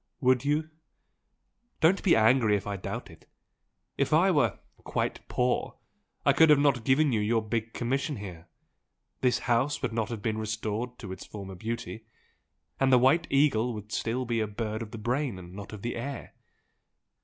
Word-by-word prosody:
"Would 130 Hz, -1 st, +3 dB
you? 150 Hz, +2 st, 0 dB, 1.1 s
Don't 180 Hz, +4 st, +4 dB
be 185 Hz, -, +4 dB
angry 110 Hz, -1 st, +4 dB
if 100 Hz, -, -7 dB
I 100 Hz, -1 st, -3 dB
doubt 95 Hz, -, -6 dB
it! -, -, -18 dB, 0.7 s
If -, -, +1 dB
I -, -, +5 dB
were -, -, +2 dB, 0.3 s
'quite -, -, -2 dB
poor' 125 Hz, 0 st, 0 dB, 0.5 s
I -, -, +5 dB
could 160 Hz, -1 st, +6 dB
not 140 Hz, 0 st, +4 dB
have 120 Hz, -2 st, -9 dB
given 135 Hz, +4 st, +3 dB
you 110 Hz, -, +1 dB
your 110 Hz, +2 st, +1 dB
big 110 Hz, +1 st, -2 dB
commission 135 Hz, +5 st, -1 dB
here 90 Hz, -6 st, -9 dB, 0.7 s
this 125 Hz, -1 st, +2 dB
house 125 Hz, +5 st, +1 dB
would 125 Hz, -, -1 dB
not 110 Hz, -2 st, -1 dB
have 115 Hz, -4 st, -6 dB
been 110 Hz, -1 st, -1 dB
restored 110 Hz, +3 st, -3 dB
to 100 Hz, -5 st, -8 dB
its 95 Hz, -, -7 dB
former 100 Hz, -2 st, -8 dB
beauty, 115 Hz, +3 st, -5 dB, 0.7 s
and 135 Hz, -1 st, +3 dB
the 130 Hz, -, +7 dB
White 135 Hz, +7 st, +4 dB
Eagle 125 Hz, -5 st, +2 dB
would 105 Hz, 0 st, -8 dB
be -, -, -8 dB
still 125 Hz, +3 st, -1 dB
a 115 Hz, -2 st, 0 dB
bird 110 Hz, +1 st, -4 dB
of 115 Hz, -, -6 dB
the 115 Hz, -, -8 dB
brain 125 Hz, +1 st, -1 dB
and 90 Hz, -1 st, -11 dB
not 100 Hz, +1 st, -8 dB
of 105 Hz, -2 st, -9 dB
the 120 Hz, -, -2 dB
air! 135 Hz, +2 st, -6 dB
115 Hz, 180 wpm, -28 LUFS, 110-130 Hz, 1.1 s, the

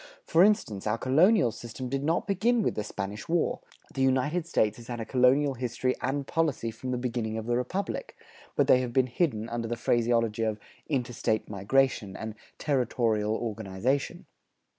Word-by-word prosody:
For 170 Hz, -, +4 dB
instance, 190 Hz, -, +1 dB
our 110 Hz, +2 st, +1 dB
colonial 155 Hz, -, +4 dB
system 120 Hz, +3 st, -7 dB
did 135 Hz, +2 st, -2 dB
not 165 Hz, +3 st, +1 dB
begin 220 Hz, +4 st, +2 dB
with -, -, +1 dB
the 105 Hz, -, -3 dB
Spanish 105 Hz, -, -6 dB
War; 170 Hz, 0 st, +1 dB, 0.3 s
the 135 Hz, -, -2 dB
United 135 Hz, +6 st, +1 dB
States 110 Hz, -10 st, +1 dB
has 115 Hz, -1 st, -12 dB
had 120 Hz, -1 st, -5 dB
a 115 Hz, -, -3 dB
colonial 135 Hz, +4 st, +3 dB
history 125 Hz, +1 st, -1 dB
and 135 Hz, +2 st, -1 dB
policy 145 Hz, -7 st, 0 dB
from 130 Hz, +4 st, -7 dB
the 125 Hz, -, 0 dB
beginning 120 Hz, -3 st, -2 dB
of 110 Hz, -, -4 dB
the 120 Hz, +1 st, 0 dB
Republic; 185 Hz, +11 st, -3 dB, 0.4 s
but -, -, +3 dB
they 125 Hz, -, +6 dB
have 125 Hz, -2 st, -4 dB
been 130 Hz, 0 st, +4 dB
hidden 125 Hz, -4 st, -1 dB
under 115 Hz, 0 st, -3 dB
the 120 Hz, +1 st, -3 dB
phraseology 115 Hz, -2 st, +1 dB
of 110 Hz, -1 st, -1 dB, 0.3 s
"interstate 120 Hz, -5 st, -1 dB
migration" 105 Hz, 0 st, +1 dB
and 110 Hz, 0 st, -5 dB, 0.2 s
"territorial 115 Hz, -6 st, +1 dB
organization." 115 Hz, +4 st, -2 dB
125 Hz, 170 wpm, -28 LUFS, 110-140 Hz, 0.4 s, they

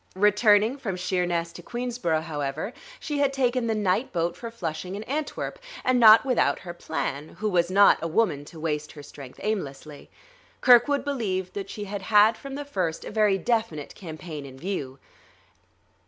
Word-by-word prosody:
Returning 210 Hz, +5 st, +4 dB
from 195 Hz, -8 st, -3 dB
Sheerness 180 Hz, -2 st, -1 dB
to -, -, -10 dB
Queensborough, 240 Hz, -10 st, -2 dB
however, 155 Hz, -, -4 dB, 0.3 s
she 295 Hz, -2 st, -3 dB
had 280 Hz, -1 st, +3 dB
taken 255 Hz, -3 st, 0 dB
the 225 Hz, -, 0 dB
night 210 Hz, +4 st, 0 dB
boat 170 Hz, -1 st, -1 dB
for 230 Hz, -, -7 dB
Flushing 180 Hz, -4 st, -5 dB
and 210 Hz, +2 st, -7 dB
Antwerp, 295 Hz, +2 st, -3 dB, 0.3 s
and 255 Hz, -1 st, +3 dB
not 225 Hz, +1 st, +8 dB
without 240 Hz, -, +2 dB
her 175 Hz, -1 st, -7 dB
plan, 140 Hz, -2 st, -4 dB
who 215 Hz, -, -2 dB
was 175 Hz, -3 st, +2 dB
not 200 Hz, +2 st, +6 dB
a 165 Hz, -, -2 dB
woman 160 Hz, -5 st, +1 dB
to 160 Hz, +1 st, -12 dB
waste 150 Hz, -1 st, -3 dB
her 145 Hz, -, -11 dB
strength 140 Hz, -3 st, -12 dB
aimlessly; 150 Hz, -8 st, -4 dB, 0.5 s
Kirkwood 250 Hz, +3 st, +5 dB
believed 195 Hz, -10 st, -2 dB
that 200 Hz, -1 st, -5 dB
she 210 Hz, -, -6 dB
had 205 Hz, 0 st, -5 dB
had 210 Hz, +2 st, +5 dB
from 275 Hz, +2 st, -8 dB
the 290 Hz, 0 st, -5 dB
first 180 Hz, -, -2 dB
a -, -, -6 dB
very 210 Hz, -2 st, +3 dB
definite 220 Hz, -10 st, -1 dB
campaign 160 Hz, -3 st, -8 dB
in 135 Hz, -1 st, -11 dB
view. 140 Hz, -6 st, -4 dB
195 Hz, 170 wpm, -26 LUFS, 160-230 Hz, 0.5 s, not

